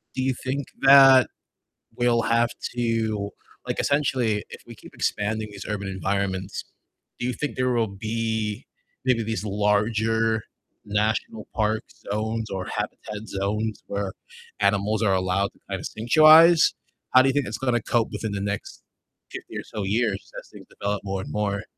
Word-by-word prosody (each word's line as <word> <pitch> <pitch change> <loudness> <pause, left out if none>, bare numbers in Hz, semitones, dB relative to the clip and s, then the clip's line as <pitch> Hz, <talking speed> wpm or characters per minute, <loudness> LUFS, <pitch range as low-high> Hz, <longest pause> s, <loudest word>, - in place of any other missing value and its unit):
Do 130 - -1
you 130 0 +1
think 135 +2 -2
that 135 -1 +8 0.7
we'll 120 -1 +2
have 115 +1 +2 0.3
to, 110 -4 -1 0.4
like, - - -3
essentially, 125 -7 +1
if - - -11
we - - -10
keep - - -15
expanding 110 +1 -1
these 100 -1 -9
urban 100 -2 -3
environments, 95 +1 -2 0.5
do 120 - -2
you 125 - 0
think 150 +2 -4
there 130 0 +1
will 115 -2 +2
be 110 +1 -3 0.4
maybe 125 -3 +2
these 110 -1 -3
larger 110 +2 +1 0.4
national 105 +1 -1
park 110 -1 0 0.3
zones 110 +1 -2
or 95 -1 -4
habitat 105 +1 -5
zones 105 +2 -2
where 100 -1 -3 0.5
animals 105 +1 +1
are 100 -3 +3
allowed 95 +1 0
to - - -27
kind 95 -1 -3
of - - -6
sanctuarize? 155 +8 +6 0.4
How 130 - +9
do 135 - +2
you 135 - +1
think 145 -2 +1
it's - - -4
gonna 125 -3 0
cope 115 0 +1
within 110 -2 -3
the 100 - -3
next 100 0 -4 0.5
50 - - -8
or - - -3
so 105 - -6
years 105 0 -1
as - - -10
things - - -13
develop 100 0 -3
more 95 -1 -3
and - - -7
more? 100 -1 -1
110 Hz, 165 wpm, -24 LUFS, 100-120 Hz, 0.7 s, How